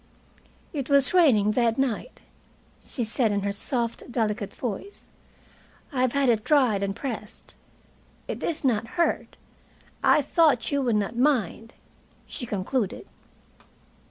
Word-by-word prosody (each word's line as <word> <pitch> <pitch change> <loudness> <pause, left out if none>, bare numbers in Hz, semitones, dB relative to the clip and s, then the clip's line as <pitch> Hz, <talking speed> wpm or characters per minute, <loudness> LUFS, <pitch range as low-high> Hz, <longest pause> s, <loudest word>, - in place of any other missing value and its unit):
"It 280 -3 -4
was 280 +1 +4
raining 245 - +5
that 230 0 +1
night," 270 - -2 0.6
she 245 - -3
said 225 0 +1
in 200 0 0
her 200 0 -1
soft, 235 +3 -3
delicate 215 -3 -2
voice. 250 - -6 0.8
"I 255 - 0
have 255 -2 +2
had 280 -1 +2
it 225 -3 +2
dried 255 -9 +3
and 200 0 -2
pressed. 235 -4 -7 0.7
It - - -5
is 325 -3 -2
not 230 -4 +1
hurt. 340 - 0 0.7
I 300 - +5
thought 295 -5 +2
you 285 -1 +1
would 240 -4 +1
not 210 +2 -1
mind," 235 - 0 0.5
she 245 - -7
concluded. 205 - -2
240 Hz, 130 wpm, -26 LUFS, 210-275 Hz, 0.8 s, raining